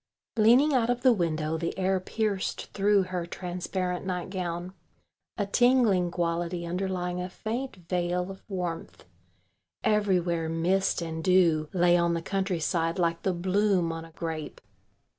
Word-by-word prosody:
Leaning 240 +7 +5
out 240 -3 +2
of 245 0 0
the 255 -2 +6
window 160 -4 -1
the 170 +2 -3
air 190 0 +1
pierced 205 0 -2
through 200 0 +3
her 180 -2 -4
transparent 180 0 -3
nightgown 180 -1 -4 0.6
a 205 - 0
tingling 220 -5 +3
quality 170 0 -2
underlying 180 0 -2
a 180 - -4
faint 235 +7 -4
veil 180 +1 -1
of 190 - -11
warmth. 180 -4 -5 0.8
Everywhere 180 -6 +1
mist 175 +3 +1
and 160 -1 -5
dew 165 -4 +3
lay 175 -1 +4
on 170 0 +2
the 165 - -2
countryside 175 -3 -1
like 170 -2 0
the 190 - +1
bloom 185 0 +1
on 165 0 -5
a 165 - -13
grape. 160 -2 -5
180 Hz, 140 wpm, -28 LUFS, 170-195 Hz, 0.8 s, the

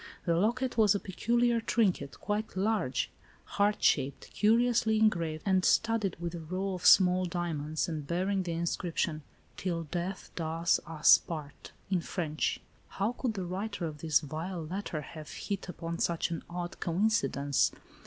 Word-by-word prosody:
The 170 - +2
locket 235 +6 0
was 210 -2 +5
a - - 0
peculiar 235 +5 +1
trinket, 195 - 0
quite 210 -1 -3
large, 195 - 0 0.3
heart 205 +1 0
shaped, 135 -1 +1
curiously 225 0 +3
engraved 170 -8 +1
and 190 -2 +3
studded 225 -4 +2
with 170 0 -4
a 170 - -5
row 185 +4 -3
of 180 -1 0
small 185 -1 +6
diamonds, 160 -3 -2
and 155 -4 -4
bearing 190 +4 0
the 175 -2 -3
inscrip 170 0 -3
tion, 155 -2 0 0.4
"'Till 170 -3 -2
death 175 +4 -4
does 165 +1 +1
us 160 -1 +6
part" 150 -4 -8 0.2
in 185 -2 +2
French. 155 -4 -2 0.3
How 200 +3 -1
could 245 -2 -3
the 190 -2 -3
writer 195 +1 -3
of 155 -2 -6
this 155 -1 +3
vile 160 +3 -5
letter 175 -2 -4
have 155 +1 -10
hit 200 -2 -5
upon 170 -1 -5
such 170 0 0
an 165 - -3
odd 175 0 -5
coincidence 165 -7 +1
180 Hz, 155 wpm, -30 LUFS, 160-205 Hz, 0.4 s, small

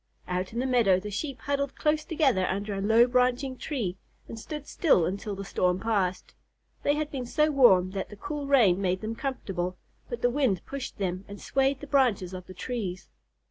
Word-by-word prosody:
Out 180 +1 -2
in 230 - -7
the 250 - 0
meadow 230 -8 +4
the 210 +2 -7
Sheep 270 +6 -4
huddled 280 -1 -1
close 305 0 +1
together 270 - +2
under 200 +2 -2
a 195 - -3
low 225 +4 +5
branching 250 +2 +1
tree, 230 - -3 0.3
and 225 - -7
stood 300 +5 -6
still 280 - +3
until 200 +3 -3
the 195 0 -6
storm 180 -1 +1
passed. 195 -5 -1 0.5
They 290 - +2
had 300 0 -2
been 255 -3 -4
so 305 +4 +2
warm 190 -10 +5
that 190 -1 -4
the 210 - -10
cool 290 +6 -5
rain 215 -10 +4
made 185 -1 0
them 220 +1 -3
comfortable, 190 -9 -3 0.3
but 480 - -5
the 245 - +4
wind 250 -9 +1
pushed 275 -2 -6
them 185 -1 -2
and 200 0 -9
swayed 270 0 0
the - - -6
branches 245 -10 +2
of 185 -1 -8
the 185 - -10
trees. 195 -6 -4
225 Hz, 200 wpm, -28 LUFS, 190-275 Hz, 0.5 s, low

